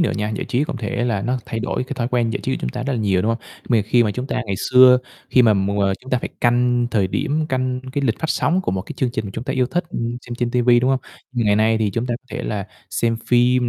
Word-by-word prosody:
nữa 170 Hz, -, +2 dB
nha, 105 Hz, 0 st, -1 dB
giải -, -, -3 dB
trí 130 Hz, +4 st, +1 dB
cũng 145 Hz, -, -5 dB
thể 120 Hz, +1 st, -2 dB
là 115 Hz, -5 st, 0 dB
nó 125 Hz, +4 st, 0 dB
thay 115 Hz, -, -3 dB
đổi 125 Hz, +1 st, -2 dB
cái 130 Hz, -, -6 dB
thói 120 Hz, -2 st, -2 dB
quen 120 Hz, -2 st, +1 dB
giải -, -, -3 dB
trí -, -, -1 dB
của -, -, -2 dB
chúng 60 Hz, -, -2 dB
ta 120 Hz, -, -4 dB
rất 140 Hz, -, -2 dB
là 125 Hz, -, -1 dB
nhiều, 95 Hz, -4 st, +1 dB
đúng 110 Hz, -, +1 dB
không? 115 Hz, -, -10 dB, 0.3 s
Mà 115 Hz, -4 st, +4 dB
khi 120 Hz, +4 st, +3 dB
mà 110 Hz, -, +1 dB
chúng 125 Hz, +5 st, -4 dB
ta 125 Hz, -, -2 dB
ngày 100 Hz, -, -1 dB, 0.2 s
xưa, 125 Hz, 0 st, +8 dB, 0.3 s
khi 125 Hz, -, +5 dB
mà 110 Hz, -3 st, +5 dB
mỗi 100 Hz, 0 st, +1 dB
ng -, -, +1 dB
chúng 130 Hz, -, -11 dB
ta 125 Hz, -, +2 dB
phải -, -, -4 dB
canh 120 Hz, 0 st, +3 dB
thời 100 Hz, -5 st, +2 dB
điểm, 150 Hz, -, -1 dB
canh 130 Hz, -1 st, -1 dB
cái 140 Hz, 0 st, -1 dB
lịch 115 Hz, -4 st, 0 dB
phát 160 Hz, -, -3 dB
sóng 180 Hz, +3 st, +1 dB
của 185 Hz, -, -2 dB
một 95 Hz, -1 st, -2 dB
cái -, -, -8 dB
chương 130 Hz, -, 0 dB
trình 110 Hz, -4 st, -4 dB
chúng 115 Hz, -, -5 dB
ta 135 Hz, -, -2 dB
yêu 130 Hz, -2 st, +1 dB
thích, 175 Hz, +7 st, -1 dB
ừm, 120 Hz, -4 st, -3 dB
xem 120 Hz, -, -5 dB
trên 120 Hz, 0 st, -1 dB
ti 125 Hz, -, +1 dB
vi, 120 Hz, 0 st, +5 dB
đúng 130 Hz, +2 st, +2 dB
không? 135 Hz, -1 st, +1 dB, 0.3 s
Ngày 110 Hz, -5 st, +2 dB
nay 110 Hz, +1 st, +3 dB
thì 105 Hz, -2 st, +1 dB
chúng 115 Hz, +5 st, -2 dB
ta 120 Hz, -, -1 dB
có 130 Hz, -, -53 dB
thể -, -, -4 dB
là 100 Hz, -2 st, -3 dB, 0.2 s
xem 115 Hz, -1 st, 0 dB
phim 125 Hz, 0 st, +3 dB
120 Hz, 310 wpm, -21 LUFS, 110-125 Hz, 0.3 s, xưa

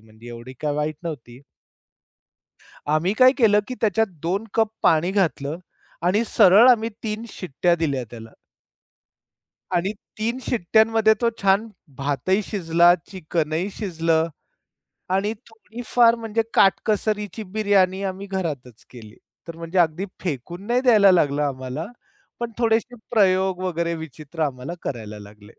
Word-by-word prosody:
म्हणजे 110 Hz, +2 st, -15 dB
एवढी 120 Hz, +2 st, -9 dB
काय 150 Hz, -1 st, -1 dB
वाईट 150 Hz, +1 st, -2 dB
नव्हती. 130 Hz, -6 st, -7 dB, 1.5 s
आम्ही 155 Hz, +6 st, +1 dB
काय 255 Hz, +3 st, +6 dB
केलं, 215 Hz, -5 st, +4 dB
की 255 Hz, -, -5 dB
त्याच्यात 220 Hz, 0 st, +2 dB, 0.2 s
2 190 Hz, +6 st, -1 dB
कप 225 Hz, -1 st, +2 dB, 0.2 s
पाणी 165 Hz, +3 st, +3 dB
घातलं 165 Hz, -6 st, -1 dB, 0.5 s
आणि 205 Hz, +5 st, +2 dB
सरळ 210 Hz, +4 st, +6 dB
आम्ही 225 Hz, -2 st, +3 dB
3 215 Hz, 0 st, -4 dB
शिट्ट्या 175 Hz, -1 st, -1 dB
दिल्या 145 Hz, -6 st, -1 dB
त्याला. 115 Hz, -1 st, -10 dB, 1.5 s
आणि 180 Hz, +3 st, 0 dB, 0.3 s
3 230 Hz, +3 st, -1 dB
शिट्ट्यांमध्ये 220 Hz, 0 st, +3 dB
तो 235 Hz, -, +3 dB
छान 200 Hz, +3 st, +3 dB, 0.3 s
भातही 145 Hz, +8 st, 0 dB
शिजला, 175 Hz, -3 st, +3 dB, 0.2 s
चिकन 160 Hz, -4 st, -3 dB
ही 175 Hz, +5 st, -1 dB
शिजलं 165 Hz, -5 st, 0 dB, 0.9 s
आणि 200 Hz, +3 st, 0 dB, 0.2 s
थोडीफार, 230 Hz, +1 st, +1 dB
म्हणजे 225 Hz, -1 st, -2 dB
काटकसरीची 210 Hz, +1 st, +1 dB
बिर्याणी 200 Hz, -3 st, +2 dB
आम्ही 195 Hz, +1 st, -4 dB
घरातच 150 Hz, -, -5 dB
केली. 110 Hz, -4 st, -13 dB, 0.3 s
तर 165 Hz, -, -7 dB
म्हणजे 165 Hz, +2 st, -3 dB
अगदी 170 Hz, +2 st, +2 dB, 0.2 s
फेकून 175 Hz, +4 st, -5 dB
नाही 240 Hz, +2 st, +2 dB
द्यायला 220 Hz, -6 st, +6 dB
लागलं 150 Hz, -4 st, +2 dB
आम्हाला 135 Hz, +2 st, -4 dB, 0.5 s
पण 235 Hz, -1 st, -3 dB
थोडेशे 230 Hz, +1 st, +1 dB, 0.2 s
प्रयोग 190 Hz, -4 st, +2 dB
वगैरे 170 Hz, -2 st, -1 dB
विचित्र 160 Hz, 0 st, -9 dB
आम्हाला 135 Hz, +1 st, -3 dB
करायला 110 Hz, -5 st, -6 dB
लागले. 105 Hz, +1 st, -15 dB
180 Hz, 130 wpm, -22 LUFS, 150-215 Hz, 1.5 s, काय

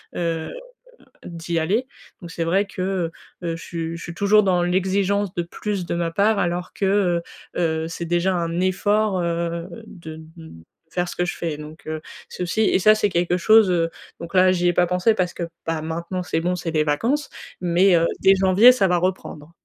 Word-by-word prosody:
heu, 165 Hz, -2 st, -2 dB, 0.8 s
d'y 170 Hz, 0 st, -4 dB
aller. 200 Hz, +11 st, 0 dB, 0.3 s
Donc 175 Hz, -, -9 dB
c'est 165 Hz, 0 st, -3 dB
vrai 190 Hz, +5 st, +1 dB
que, 190 Hz, -, -7 dB
heu, 185 Hz, -3 st, -1 dB, 0.3 s
heu, 165 Hz, -1 st, -2 dB
je 165 Hz, -, -10 dB
suis 165 Hz, -1 st, -5 dB
je 165 Hz, -, -9 dB
suis 170 Hz, -, -7 dB
toujours 200 Hz, +4 st, +4 dB
dans 185 Hz, -2 st, +2 dB
l'exigence 190 Hz, +2 st, 0 dB
de 175 Hz, -, -1 dB
plus 185 Hz, +2 st, -4 dB
de -, -, -2 dB
ma 170 Hz, -1 st, -1 dB
part, 205 Hz, +5 st, +2 dB
alors 175 Hz, -1 st, -2 dB
que, 200 Hz, -, -3 dB
heu, 190 Hz, -3 st, +2 dB, 0.4 s
heu, 160 Hz, -2 st, 0 dB
c'est 165 Hz, +1 st, -5 dB
déjà 175 Hz, +2 st, +1 dB
un 170 Hz, 0 st, -2 dB
effort, 200 Hz, +2 st, +1 dB
heu, 170 Hz, 0 st, -2 dB, 0.2 s
de 160 Hz, -3 st, -10 dB, 0.2 s
de 165 Hz, -2 st, -12 dB, 0.4 s
faire 175 Hz, 0 st, -1 dB
ce -, -, -7 dB
que 180 Hz, -, 0 dB
je 175 Hz, -, -3 dB
fais 160 Hz, -3 st, -4 dB
donc, 150 Hz, +1 st, -11 dB
heu, 155 Hz, 0 st, -3 dB, 0.3 s
c'est -, -, -5 dB
aussi 180 Hz, +5 st, -1 dB
et 220 Hz, -, +3 dB
ça, 215 Hz, +3 st, +6 dB
c'est 215 Hz, -1 st, +1 dB
quelque 175 Hz, 0 st, 0 dB
chose 215 Hz, +1 st, +5 dB
heu, 165 Hz, -2 st, +1 dB, 0.3 s
donc, 170 Hz, +2 st, -8 dB
là, 185 Hz, 0 st, +6 dB
j'y 180 Hz, -1 st, +1 dB
ai 175 Hz, -, +3 dB
pas 175 Hz, -, +3 dB
pensé 180 Hz, +5 st, +2 dB
parce 180 Hz, -3 st, -1 dB
que, -, -, -5 dB, 0.2 s
bah, 165 Hz, -1 st, -2 dB
maintenant, 170 Hz, +3 st, -4 dB
c'est 165 Hz, -2 st, -1 dB
bon, 180 Hz, +2 st, 0 dB
c'est 175 Hz, -1 st, -4 dB
les 155 Hz, -1 st, +2 dB
vacances, 235 Hz, -, 0 dB, 0.3 s
mais, 180 Hz, +1 st, +3 dB
heu, 165 Hz, 0 st, +3 dB, 0.2 s
dès 195 Hz, 0 st, +6 dB
janvier, 190 Hz, +5 st, +6 dB
ça 210 Hz, -6 st, +2 dB
va 180 Hz, -1 st, +2 dB
reprendre. 170 Hz, -4 st, -3 dB
175 Hz, 210 wpm, -22 LUFS, 170-190 Hz, 0.8 s, ça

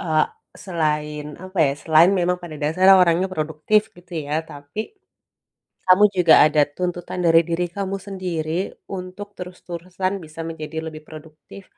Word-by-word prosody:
eee, 160 Hz, -4 st, +2 dB, 0.4 s
selain 150 Hz, -4 st, -1 dB, 0.2 s
apa 185 Hz, 0 st, -8 dB
ya, 135 Hz, -, +1 dB
selain 165 Hz, +3 st, +5 dB
memang 180 Hz, 0 st, +1 dB
pada 165 Hz, -3 st, -8 dB
dasarnya 185 Hz, +6 st, +5 dB
orangnya 175 Hz, +2 st, +2 dB
produktif, 160 Hz, +7 st, 0 dB
gitu 175 Hz, 0 st, -17 dB
ya. 150 Hz, -, -2 dB
Tapi, 145 Hz, +8 st, -8 dB, 1.0 s
kamu 185 Hz, +3 st, +6 dB
juga 175 Hz, -3 st, +6 dB
ada 150 Hz, 0 st, +3 dB, 0.2 s
tuntutan 180 Hz, 0 st, -3 dB
dari 165 Hz, 0 st, +6 dB
diri 170 Hz, +1 st, 0 dB
kamu 195 Hz, 0 st, -2 dB
sendiri, 175 Hz, -5 st, -3 dB, 0.4 s
untuk 190 Hz, +2 st, -7 dB
terus-terusan 180 Hz, +1 st, -5 dB
bisa 155 Hz, +1 st, -11 dB
menjadi 160 Hz, -1 st, -7 dB
lebih 155 Hz, -1 st, -7 dB
produktif, 155 Hz, +5 st, -13 dB
175 Hz, 140 wpm, -22 LUFS, 155-185 Hz, 1.0 s, kamu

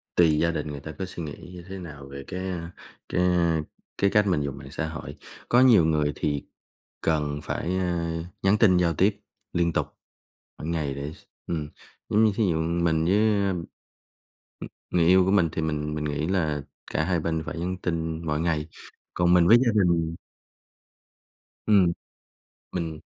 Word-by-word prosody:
tùy 80 Hz, -3 st, +5 dB
gia 85 Hz, -, +2 dB
đình 80 Hz, -, -3 dB
người 75 Hz, -1 st, -5 dB
ta 75 Hz, +3 st, -8 dB
có 95 Hz, -, -1 dB
suy 90 Hz, -2 st, -7 dB
nghĩ 75 Hz, +4 st, -8 dB
như 90 Hz, -, -9 dB
thế 95 Hz, 0 st, -6 dB
nào 75 Hz, -6 st, -9 dB
về 70 Hz, 0 st, -8 dB
cái, 95 Hz, 0 st, -4 dB
a, 85 Hz, -2 st, -5 dB, 0.4 s
cái, 90 Hz, -, +1 dB
a, 85 Hz, -3 st, +2 dB, 0.4 s
cái 100 Hz, -, +3 dB
cách 105 Hz, 0 st, +3 dB
mình 90 Hz, -6 st, +2 dB
dùng 70 Hz, -1 st, -4 dB
mạng 65 Hz, 0 st, -10 dB
xã 80 Hz, -, -3 dB
hội, 80 Hz, -1 st, -7 dB, 0.3 s
có 120 Hz, -, +5 dB
nhiều 115 Hz, -10 st, +7 dB
người 75 Hz, -2 st, +2 dB
thì 75 Hz, -2 st, -2 dB, 0.6 s
cần 75 Hz, -2 st, 0 dB
phải, 90 Hz, +3 st, -2 dB
ơ, 85 Hz, -2 st, -1 dB, 0.2 s
nhắn 95 Hz, +2 st, +4 dB
tin 95 Hz, -5 st, +5 dB
giao 85 Hz, -2 st, +2 dB
tiếp 100 Hz, +4 st, +2 dB, 0.3 s
liên 85 Hz, -1 st, +1 dB
tục -, -, 0 dB, 0.7 s
mỗi 75 Hz, -, -6 dB
ngày 80 Hz, -4 st, -1 dB
để 70 Hz, +2 st, -5 dB
s -, -, -18 dB, 0.2 s
ừm, 75 Hz, -3 st, -3 dB, 0.4 s
giống 110 Hz, +2 st, +4 dB
như 110 Hz, -, +4 dB
thí 115 Hz, -, +1 dB
dụ 80 Hz, 0 st, 0 dB
mình 80 Hz, -1 st, +1 dB
với, 95 Hz, +4 st, +3 dB, 0.3 s
ơ, -, -, +1 dB
ừm, 90 Hz, -3 st, -2 dB, 1.3 s
người 85 Hz, -2 st, +3 dB
yêu 95 Hz, +1 st, +6 dB
của 95 Hz, -, +2 dB
mình, 90 Hz, -5 st, +4 dB
thì 80 Hz, -, -2 dB
mình 75 Hz, -1 st, -2 dB
mình 75 Hz, -, -3 dB
nghĩ 75 Hz, +2 st, -1 dB
là 80 Hz, -6 st, 0 dB, 0.3 s
cả 80 Hz, -, +1 dB
hai 90 Hz, 0 st, +1 dB
bên 80 Hz, 0 st, -1 dB
phải 85 Hz, -, -5 dB
nhắn 90 Hz, +1 st, -2 dB
tin 80 Hz, -1 st, -2 dB
mỗi 75 Hz, -1 st, 0 dB
ngày, 80 Hz, -2 st, 0 dB, 0.5 s
còn 90 Hz, 0 st, +3 dB
mình 85 Hz, -1 st, +5 dB
với 115 Hz, -, +8 dB
gia 120 Hz, -, +4 dB
đình 85 Hz, -2 st, +1 dB, 1.5 s
ừm, 100 Hz, -5 st, +5 dB, 0.8 s
mình 80 Hz, -3 st, -3 dB
85 Hz, 190 wpm, -26 LUFS, 75-90 Hz, 1.5 s, với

